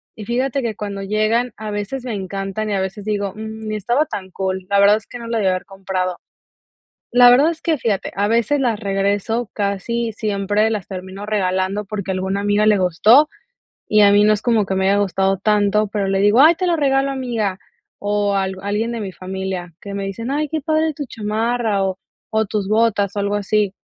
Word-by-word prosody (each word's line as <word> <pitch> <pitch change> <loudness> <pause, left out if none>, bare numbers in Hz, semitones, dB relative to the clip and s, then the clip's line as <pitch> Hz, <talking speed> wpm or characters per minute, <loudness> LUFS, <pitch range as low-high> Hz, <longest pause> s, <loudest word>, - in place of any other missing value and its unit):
y 215 - -8
fíjate 260 +4 -1
que 230 -3 -3
cuando 200 -1 -5
llegan, 215 +4 0
a 215 0 -6
veces 205 +6 -4
me 245 - -4
encantan, 195 +2 -4
y - - -1
a 195 - 0
veces 195 +2 -5
digo: 205 -2 -2
"Mm, 220 0 -7
ni 215 - -2
estaba 240 +9 +1
tan 190 -10 -6
cool, 190 0 -3
la 200 0 +3
verdad 200 +1 +6
es 215 - -12
que 245 - -8
no 235 - -8
la 230 0 -1
debí 195 -3 +2
haber 185 -1 -2
comprado. 190 -2 -3 0.9
La 245 0 +7
verdad 280 +7 +5
es 320 - -9
que 320 -2 +1
fíjate, 215 -6 -1
a 200 +1 +1
veces 235 +6 +2
las 235 -5 0
regreso 200 +3 -1
casi 215 +3 -2
siempre 205 0 0
las 210 -5 -3
termino 190 +1 -7
regalando 190 0 0
porque 200 -2 -5
a - - 0
alguna 190 +1 -2
amiga 205 +1 +2
le 215 -1 +5
gustó 210 - +5 0.6
y 215 0 +4
a 200 -1 +7
mí 205 0 +5
no 215 - +5
es 210 - -2
como 225 -4 +2
que 190 - -2
me 190 0 +2
haya 200 - +3
gustado 195 -1 +1
tanto, 210 +1 +2
pero 200 -1 -2
le 195 - +1
digo: 205 +5 +5
"Ay, 320 +4 +7
te 365 +2 -1
lo 345 - +2
regalo, 275 -2 +1
amiga". 230 -8 -2 0.4
O 205 0 0
alg 190 0 -1
alguien 215 +4 -1
de 230 - -4
mi 195 -2 -5
familia 185 -1 -5
que 200 -1 -7
me 200 0 -3
dicen: 230 +6 -4
"Ay, 300 +2 0
qué 315 +1 -2
padre 315 +1 +1
tu 290 - -5
chamarra". 220 -1 -1
O 190 -1 -2 0.3
o 220 0 +1
tus 205 -1 -3
botas, 215 -3 +2
o - - -1
algo 200 +1 0
así. 205 -1 0
205 Hz, 220 wpm, -20 LUFS, 195-230 Hz, 0.9 s, La